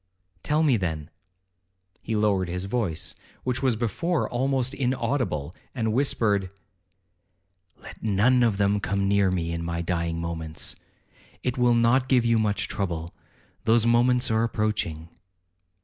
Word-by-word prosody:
'Tell 150 Hz, -, +1 dB
me 135 Hz, -6 st, +4 dB
then.' 80 Hz, -6 st, -3 dB, 0.9 s
He 110 Hz, -, -3 dB
lowered 100 Hz, -4 st, +1 dB
his 90 Hz, +2 st, -3 dB
voice, 100 Hz, -7 st, -2 dB, 0.3 s
which 125 Hz, 0 st, -1 dB
was 130 Hz, -4 st, +2 dB
before 135 Hz, -, -1 dB
almost 130 Hz, +1 st, 0 dB
inaudible, 120 Hz, -, -1 dB, 0.2 s
and 110 Hz, -3 st, 0 dB
whispered, 105 Hz, -7 st, +1 dB, 1.3 s
'Let -, -, -12 dB
none 110 Hz, +4 st, +3 dB
of 115 Hz, -5 st, +2 dB
them 100 Hz, 0 st, +2 dB
come 100 Hz, 0 st, -1 dB
near 100 Hz, -1 st, +3 dB
me 85 Hz, -3 st, -1 dB
in 85 Hz, 0 st, -3 dB
my 85 Hz, 0 st, -2 dB
dying 85 Hz, -1 st, -1 dB
moments—it 85 Hz, +8 st, -6 dB
will 120 Hz, -1 st, +3 dB
not 120 Hz, +3 st, +3 dB
give 125 Hz, -3 st, +4 dB
you 115 Hz, -1 st, +3 dB
much 105 Hz, -3 st, 0 dB
trouble—those 100 Hz, +5 st, -2 dB
moments 120 Hz, +1 st, +3 dB
are 110 Hz, +1 st, +2 dB
approaching.' 105 Hz, -8 st, -1 dB
110 Hz, 130 wpm, -26 LUFS, 90-125 Hz, 1.3 s, me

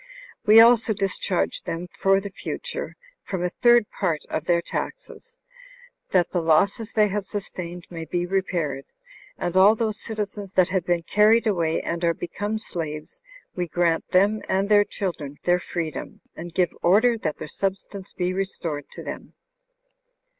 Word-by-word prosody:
We 215 Hz, +2 st, +9 dB
also 230 Hz, -1 st, +6 dB
discharge 195 Hz, -, -1 dB
them 170 Hz, +2 st, -5 dB
for 195 Hz, 0 st, +3 dB
the 200 Hz, 0 st, -7 dB
future -, -, -5 dB, 0.3 s
from 185 Hz, -3 st, -3 dB
a 180 Hz, -, -1 dB
third 240 Hz, -2 st, +6 dB
part 165 Hz, -6 st, -2 dB
of 160 Hz, -, -2 dB
their 170 Hz, 0 st, +3 dB
taxes, 475 Hz, -, -6 dB, 0.7 s
that 180 Hz, -2 st, +2 dB
the 175 Hz, -, 0 dB
losses 195 Hz, +8 st, +2 dB
they 215 Hz, -1 st, +4 dB
have 205 Hz, +1 st, -2 dB
sustained 180 Hz, -3 st, -6 dB
may 165 Hz, -2 st, -6 dB
be 175 Hz, +2 st, -2 dB
repaired. 175 Hz, -7 st, -1 dB, 0.5 s
And 175 Hz, -, -3 dB
all 195 Hz, +3 st, +7 dB
those 220 Hz, -1 st, -2 dB
citizens 205 Hz, -3 st, -5 dB
that 185 Hz, -1 st, +4 dB
have 185 Hz, -2 st, -1 dB
been 175 Hz, -1 st, +1 dB
carried 215 Hz, +6 st, +4 dB
away, 170 Hz, -6 st, +1 dB
and 170 Hz, +1 st, -3 dB
are 170 Hz, -1 st, +2 dB
become 205 Hz, +5 st, -3 dB
slaves, 155 Hz, -7 st, -6 dB, 0.3 s
we 180 Hz, -1 st, -2 dB
grant 170 Hz, 0 st, +1 dB
them 205 Hz, +4 st, +3 dB
and 195 Hz, +2 st, +1 dB
their 205 Hz, -1 st, +6 dB
children 155 Hz, -9 st, -5 dB
their 175 Hz, 0 st, +3 dB
freedom, 165 Hz, -3 st, -5 dB
and 170 Hz, +1 st, -7 dB
give 175 Hz, 0 st, +1 dB
order 220 Hz, +7 st, +4 dB
that 155 Hz, -7 st, -3 dB
their -, -, -7 dB
substance 195 Hz, +2 st, -4 dB
be 180 Hz, 0 st, -2 dB
restored 170 Hz, -6 st, -3 dB
to -, -, -9 dB
them." -, -, -8 dB
185 Hz, 160 wpm, -24 LUFS, 170-205 Hz, 0.7 s, We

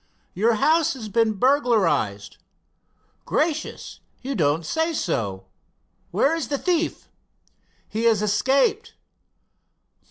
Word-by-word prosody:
"Your 225 Hz, +5 st, +2 dB
house 315 Hz, +8 st, +2 dB
has 220 Hz, -5 st, -7 dB
been 225 Hz, 0 st, +2 dB
burglarized." 210 Hz, -, +1 dB, 0.9 s
"Gracious 315 Hz, 0 st, -2 dB, 0.3 s
I -, -, -4 dB
you -, -, 0 dB
don't 160 Hz, -, 0 dB
say 320 Hz, -, -1 dB
so. 100 Hz, -, -2 dB, 0.6 s
Where 275 Hz, -, +2 dB
is 320 Hz, -7 st, -3 dB
the 285 Hz, -, -1 dB
thief?" 340 Hz, +1 st, -1 dB, 0.8 s
"He 225 Hz, +2 st, -3 dB
has 220 Hz, -3 st, +3 dB
escaped." 270 Hz, -, +1 dB
230 Hz, 105 wpm, -23 LUFS, 195-300 Hz, 0.9 s, has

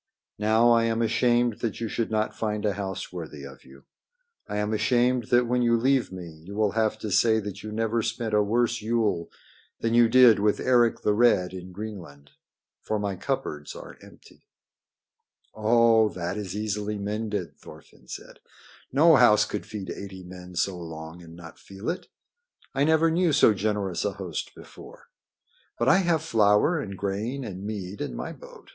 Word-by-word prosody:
Now 110 Hz, +3 st, +4 dB
I 115 Hz, -1 st, +4 dB
am 115 Hz, 0 st, 0 dB
ashamed 120 Hz, 0 st, +2 dB
that 115 Hz, -3 st, -3 dB
you 115 Hz, -, -2 dB
should 115 Hz, +1 st, -2 dB
not 110 Hz, 0 st, -1 dB
find 105 Hz, -1 st, -2 dB
a 105 Hz, -, +1 dB
house 95 Hz, -2 st, -5 dB
worthy 75 Hz, -5 st, -7 dB
of 70 Hz, -1 st, -11 dB
you. 70 Hz, +1 st, -17 dB, 0.7 s
I 105 Hz, -, -3 dB
am 105 Hz, +1 st, -1 dB
ashamed 125 Hz, +2 st, +2 dB
that 120 Hz, +1 st, +3 dB
when 125 Hz, +1 st, 0 dB
you 115 Hz, -1 st, +3 dB
leave 130 Hz, 0 st, +1 dB
me 85 Hz, -4 st, -9 dB
you 100 Hz, +4 st, -9 dB
will 105 Hz, -1 st, +1 dB
have 110 Hz, -1 st, 0 dB
to 105 Hz, -, -4 dB
say 110 Hz, +3 st, +4 dB
that 105 Hz, -2 st, -7 dB
you 110 Hz, -, -7 dB
never 115 Hz, +1 st, 0 dB
spent 115 Hz, 0 st, -3 dB
a 105 Hz, -, +4 dB
worse 120 Hz, +3 st, 0 dB
Yule 110 Hz, -6 st, 0 dB, 0.5 s
than 115 Hz, 0 st, -1 dB
you 120 Hz, -1 st, +5 dB
did 125 Hz, -4 st, +7 dB
with 105 Hz, 0 st, +1 dB
Eric 120 Hz, -2 st, +2 dB
the 105 Hz, -, +2 dB
Red 105 Hz, -5 st, +3 dB
in 90 Hz, 0 st, -8 dB
Greenland. 90 Hz, -9 st, -9 dB, 0.5 s
For 110 Hz, -, -2 dB
my 100 Hz, -2 st, -2 dB
cupboards 75 Hz, -4 st, -4 dB
are -, -, -11 dB
empty." -, -, -18 dB, 1.1 s
"Oh, 115 Hz, 0 st, +4 dB
that 90 Hz, 0 st, -4 dB
is 100 Hz, -3 st, -5 dB
easily 105 Hz, 0 st, -3 dB
mended," 105 Hz, -5 st, -4 dB
Thorfinn 65 Hz, -, -15 dB
said. -, -, -10 dB, 0.5 s
"No 155 Hz, +3 st, +6 dB
house 105 Hz, -4 st, +5 dB
could 105 Hz, -, -5 dB
feed 100 Hz, -5 st, -6 dB
eighty 95 Hz, -1 st, -8 dB
men 90 Hz, 0 st, -11 dB
so 90 Hz, +1 st, -1 dB
long 80 Hz, 0 st, -9 dB
and 85 Hz, -1 st, -13 dB
not 85 Hz, -1 st, -12 dB
feel 100 Hz, +8 st, -5 dB
it. 180 Hz, -, -7 dB, 0.7 s
I 140 Hz, +2 st, +2 dB
never 160 Hz, +1 st, +3 dB
knew 170 Hz, 0 st, +2 dB
so 125 Hz, -6 st, +5 dB
generous 100 Hz, -3 st, -2 dB
a 105 Hz, -, -1 dB
host 95 Hz, -5 st, -6 dB
before. -, -, -14 dB, 0.7 s
But 120 Hz, -, 0 dB
I 140 Hz, -, +6 dB
have 170 Hz, -4 st, +1 dB
flour 110 Hz, +5 st, +3 dB
and 100 Hz, -9 st, -6 dB
grain 105 Hz, +8 st, -3 dB
and 95 Hz, -4 st, -7 dB
mead 100 Hz, -2 st, -6 dB
in -, -, -4 dB
my -, -, -5 dB
boat. -, -, -15 dB
105 Hz, 180 wpm, -26 LUFS, 95-115 Hz, 1.1 s, did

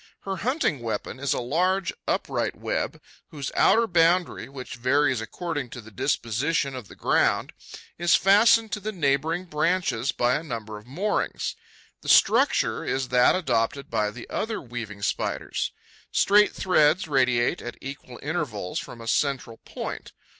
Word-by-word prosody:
Her 195 Hz, -1 st, -4 dB
hunting 245 Hz, -, 0 dB
weapon 115 Hz, +2 st, -4 dB
is 140 Hz, 0 st, -1 dB
a -, -, +1 dB
large 180 Hz, +9 st, 0 dB
upright -, -, -1 dB
web, -, -, -3 dB, 0.3 s
whose 140 Hz, -3 st, -6 dB
outer 230 Hz, +1 st, +5 dB
boundary, 170 Hz, -, +2 dB
which 135 Hz, -2 st, -8 dB
varies 130 Hz, 0 st, +2 dB
according 145 Hz, +4 st, -4 dB
to 120 Hz, -, -8 dB
the 110 Hz, -1 st, -12 dB
disposition 135 Hz, -, 0 dB
of 125 Hz, -5 st, -7 dB
the -, -, -13 dB
ground, -, -, +1 dB, 0.5 s
is 175 Hz, 0 st, +4 dB
fastened 210 Hz, +3 st, +5 dB
to 210 Hz, -, -2 dB
the 215 Hz, +2 st, -4 dB
neighbouring 160 Hz, 0 st, 0 dB
branches 160 Hz, -6 st, 0 dB
by 120 Hz, +1 st, +1 dB
a -, -, -5 dB
number 110 Hz, -7 st, -6 dB
of 105 Hz, -, -19 dB
moorings. 185 Hz, +11 st, -2 dB, 0.5 s
The -, -, -6 dB
structure -, -, +4 dB
is 130 Hz, -1 st, -2 dB
that 125 Hz, -1 st, +5 dB
adopted 135 Hz, -5 st, -1 dB
by 105 Hz, 0 st, +1 dB
the 120 Hz, +3 st, -10 dB
other 220 Hz, 0 st, -2 dB
weaving 115 Hz, -5 st, -7 dB
Spiders. -, -, -2 dB, 0.4 s
Straight 210 Hz, +1 st, +5 dB
threads 175 Hz, -1 st, +3 dB
radiate 125 Hz, -4 st, +2 dB
at 120 Hz, -, -7 dB
equal 135 Hz, -3 st, -9 dB
intervals 140 Hz, -, -3 dB
from 120 Hz, -, -9 dB
a 115 Hz, -, -9 dB
central 130 Hz, -3 st, 0 dB
point. -, -, -6 dB
140 Hz, 150 wpm, -25 LUFS, 120-175 Hz, 0.5 s, outer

